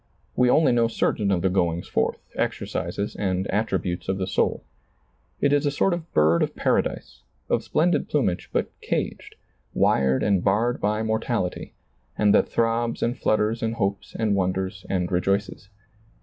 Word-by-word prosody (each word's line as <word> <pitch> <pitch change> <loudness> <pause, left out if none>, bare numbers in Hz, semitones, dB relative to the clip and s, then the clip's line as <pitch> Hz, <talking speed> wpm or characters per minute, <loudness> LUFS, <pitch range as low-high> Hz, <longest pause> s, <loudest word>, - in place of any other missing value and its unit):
We 125 -1 +3
only 150 0 +4
know 120 -1 +3
certain 105 -2 0
of 90 -3 +1
the 95 - +3
goings 85 -2 0
forth, 65 - 0 0.2
exer - - -1
cises 100 +1 -3
and 95 -1 0
attributes 95 -5 -1
of 95 - 0
the 95 - -1
soul. 95 - 0 0.8
It 145 0 +2
is 145 0 +2
a - - +4
sort 160 +6 +1
of 170 -1 -6
bird 80 +2 +3
of - - -1
paradise, - - -1 0.3
of - - +1
splendid 175 +3 +1
plumage, 105 -12 0
but - - -1
caged, - - -3 0.4
wired 65 -1 +2
and 100 -3 +2
barred 110 +5 +1
by 105 +1 0
mortality, 110 -3 -2 0.4
and 105 -1 +4
that - - +4
throbs 115 0 0
and 120 +1 0
flutters 110 +2 0
and 115 0 -1
hopes 100 -3 -2
and 110 -2 +1
wonders 95 0 -2
and 90 -2 -1
rejoices. 95 +2 -1
100 Hz, 165 wpm, -24 LUFS, 95-115 Hz, 0.8 s, only